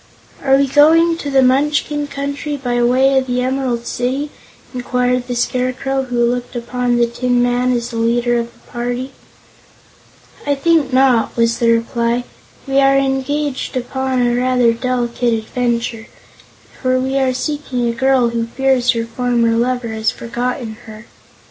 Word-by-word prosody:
"Are 270 -1 +3
we 280 - +3
going 325 +5 +5
to 290 - -5
the 270 -1 +4
Munchkin 290 +2 +1
Country 285 +1 -4
by 245 -3 -1
way 265 +3 +3
of 260 - -5
the 250 0 0
Emerald 255 -2 -1
City?" 270 +4 -2 0.4
inquired 250 0 -1
the 245 - -3
Scarecrow, 255 +2 -1
who 240 -2 0
looked 245 +1 -2
upon 245 0 -1
the 240 - +4
Tin 245 +1 -1
Woodman 245 +1 +1
as 240 -1 -2
the 230 - -5
leader 240 +1 +1
of 235 0 -5
the - - -24
party. 245 +2 -3 1.3
"I 285 0 0
think 305 -1 +2
not," 255 -4 +2
was 230 0 +1
the 235 - +2
reply. 235 +1 0 0.4
"We 270 0 +2
are 275 0 +4
engaged 275 0 -1
upon 260 0 -1
a 240 - +1
rather 250 -1 +2
delicate 240 -1 -1
adventure, 235 0 -2 0.7
for 255 -1 +1
we 265 +1 -1
are 265 -1 +2
seeking 255 -2 -2
a - - +1
girl 260 0 +2
who 230 -1 -2
fears 255 0 +1
her 230 -1 -2
former 235 0 0
lover 245 0 0
has 220 0 0
forgotten 240 -1 -4
her. 215 +1 -11
250 Hz, 155 wpm, -17 LUFS, 240-270 Hz, 1.3 s, going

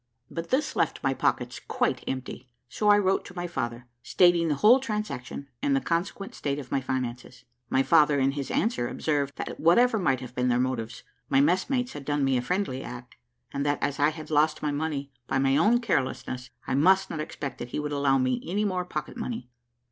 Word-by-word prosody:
But 165 0 -5
this 300 +4 0
left - - 0
my - - +2
pockets - - -1
quite - - 0
empty, 130 -1 -5 0.2
so 210 - 0
I 205 - +7
wrote 195 -1 +2
to 180 - -11
my 175 -1 -3
father, 120 -8 -4 0.2
stating 175 +3 +4
the 150 - +1
whole 225 - +6
transaction, 210 - -4
and 140 - +2
the - - +3
consequent 175 +6 -2
state 140 -1 -2
of 135 -4 -8
my 135 - +1
finances. 125 -1 -4 0.3
My 130 - +3
father, 150 -2 +4
in 135 +1 +3
his 140 -1 -4
answer, 215 - 0
observed 145 -1 -1
that - - -6
whatever 225 +8 +4
might 135 -9 +1
have 125 -1 -9
been 125 0 0
their 120 -1 +3
motives, 125 -3 -2 0.3
my 135 - +4
messmates 185 - +1
had 145 - -7
done 145 0 0
me 135 -1 +2
a 125 - +1
friendly 155 -3 -1
act; 125 0 -9 0.4
and 140 - -1
that 145 0 +1
as 145 0 -1
I 145 +1 +5
had 155 0 -8
lost 155 +1 +2
my 150 - +1
money 145 -2 -3 0.2
by 135 - 0
my 135 0 +3
own 210 +11 +4
carelessness, 130 - -2 0.2
I - - -2
must 185 +8 +4
not 160 - -4
expect 140 -3 -5
that 120 - -6
he - - -3
would 150 0 -3
allow 140 -1 +2
me 130 -1 0
any 205 +5 -1
more 185 -3 -1
pocket 180 - -5
money. 225 - -5
145 Hz, 210 wpm, -27 LUFS, 130-180 Hz, 0.4 s, I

